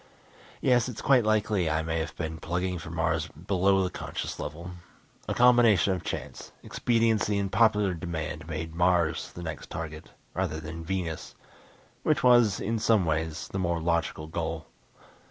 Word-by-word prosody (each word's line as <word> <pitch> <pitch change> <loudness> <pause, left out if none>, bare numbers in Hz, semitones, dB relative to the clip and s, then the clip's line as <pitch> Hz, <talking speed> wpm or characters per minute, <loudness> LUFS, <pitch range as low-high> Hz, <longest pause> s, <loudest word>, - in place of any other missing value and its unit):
Yes, 125 -1 +3
it's 120 - -7
quite 130 -4 +4
likely 105 -5 +2
I 80 +1 0
may 80 0 -1
have 80 +1 -4
been 80 -1 -4
plugging 90 +1 -2
for 80 - -8
Mars 80 0 0
below 95 +4 +1
the 90 - -2
conscious - - -5
level. 85 +4 -6 0.6
A - - -1
combination 120 -6 +5
of 90 -3 -4
chance, 80 - -6
expediency 115 -3 +1
and 100 -1 -1
popular 105 -3 +3
demand 80 -2 -5
made 80 0 -5
Mars 85 -2 +1
the 85 - -8
next 80 -3 -6
target, 80 -1 -6 0.2
rather 85 -3 -2
than 80 +1 -7
Venus, 85 -2 -4 0.7
which - - +1
was, 120 -6 +5
in 115 +2 -1
some 110 -4 +3
ways, 80 0 -2
the 95 - -3
more 85 -2 0
logical 80 -2 -1
goal. 80 0 -4
85 Hz, 155 wpm, -28 LUFS, 80-100 Hz, 0.7 s, combination